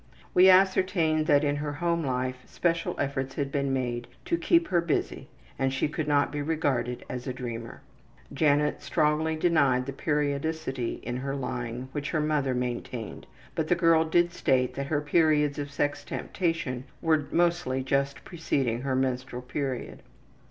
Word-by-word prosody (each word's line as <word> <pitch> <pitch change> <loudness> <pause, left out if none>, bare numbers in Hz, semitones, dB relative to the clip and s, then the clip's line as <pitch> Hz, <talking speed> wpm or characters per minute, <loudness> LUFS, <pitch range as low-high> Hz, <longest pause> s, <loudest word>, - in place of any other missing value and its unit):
We 185 +1 +7
ascertained 185 -4 +3
that 145 0 +5
in 145 0 +1
her 145 0 -3
home 170 +2 0
life 130 -1 -1
special 170 -1 -1
efforts 135 -1 -2
had 140 -2 -2
been 140 -1 0
made 120 -2 -2 0.2
to 340 - +1
keep 335 0 +2
her 175 -2 +3
busy 170 -2 -2 0.3
and 135 0 +1
she 135 - 0
could 150 0 -3
not 145 -1 +2
be 145 0 -3
regarded 140 -6 -1
as 125 0 -6
a 130 - -2
dreamer. 120 -2 -6 0.5
Janet 150 0 +2
strongly 155 +1 +1
denied 140 -6 +3
the 140 - -5
periodicity 145 -3 -2
in 120 +1 -3
her 135 +2 -3
lying 125 -2 -4
which 145 0 -3
her 155 - 0
mother 150 -4 +1
maintained, 125 -2 -4 0.3
but 160 - -1
the 175 - +3
girl 165 -2 +4
did 175 +2 +2
state 130 -6 +1
that 140 0 -4
her 145 0 0
periods 150 -1 +2
of 145 -1 -4
sex 145 0 -1
temptation 155 -8 -2
were 155 -3 +1
mostly 170 -6 +1
just 140 +1 0
preceding 135 -9 -1
her 135 -1 -1
menstrual 130 -1 -2
period. 130 -1 -4
145 Hz, 160 wpm, -27 LUFS, 130-160 Hz, 0.5 s, We